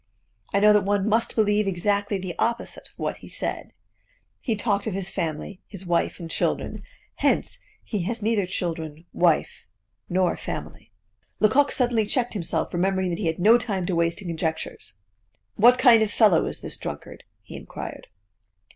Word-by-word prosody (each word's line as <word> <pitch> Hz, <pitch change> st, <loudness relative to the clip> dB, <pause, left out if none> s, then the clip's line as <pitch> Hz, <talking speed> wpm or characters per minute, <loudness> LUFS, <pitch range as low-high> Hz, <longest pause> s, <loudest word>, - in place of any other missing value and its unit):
I 200 Hz, -, +2 dB
know 210 Hz, +1 st, +6 dB
that 210 Hz, -, +5 dB
one 200 Hz, +1 st, 0 dB
must 225 Hz, +2 st, +1 dB
believe 210 Hz, -1 st, +2 dB
exactly 200 Hz, +2 st, 0 dB
the 185 Hz, -2 st, -5 dB
opposite 235 Hz, +1 st, -1 dB
of -, -, -27 dB
what -, -, -3 dB
he -, -, -13 dB
said. -, -, -4 dB, 0.7 s
He 230 Hz, -, -1 dB
talked 205 Hz, -1 st, -1 dB
of 205 Hz, -, -2 dB
his 195 Hz, -1 st, -3 dB
family, 165 Hz, +3 st, -4 dB
his 195 Hz, -2 st, -10 dB
wife 175 Hz, +1 st, 0 dB
and 170 Hz, -, -6 dB
children -, -, -2 dB, 0.4 s
hence, -, -, +1 dB, 0.2 s
he 210 Hz, -4 st, -3 dB
has 225 Hz, +2 st, -3 dB
neither 215 Hz, -4 st, +1 dB
children, 165 Hz, -3 st, -4 dB
wife, 170 Hz, -3 st, +2 dB, 0.5 s
nor 180 Hz, 0 st, +2 dB
family." -, -, -7 dB, 0.5 s
Lecoq 265 Hz, +7 st, +4 dB
suddenly 240 Hz, -4 st, +1 dB
checked 245 Hz, +1 st, 0 dB
himself, 170 Hz, -5 st, -2 dB
remembering 190 Hz, +1 st, +1 dB
that 170 Hz, -, -3 dB
he 195 Hz, -, -1 dB
had 160 Hz, -, -1 dB
no 220 Hz, +6 st, +6 dB
time 200 Hz, -7 st, -2 dB
to 180 Hz, -, -1 dB
waste 170 Hz, +3 st, 0 dB
in -, -, -7 dB
conjectures. 160 Hz, -6 st, -4 dB, 0.6 s
"What 245 Hz, +4 st, +6 dB
kind 245 Hz, -4 st, +6 dB
of 220 Hz, -, +2 dB
fellow 205 Hz, -6 st, +4 dB
was -, -, -4 dB
this -, -, -6 dB
drunkard?" -, -, -7 dB, 0.2 s
he -, -, -11 dB
inquired. -, -, -8 dB
200 Hz, 170 wpm, -25 LUFS, 175-220 Hz, 0.7 s, know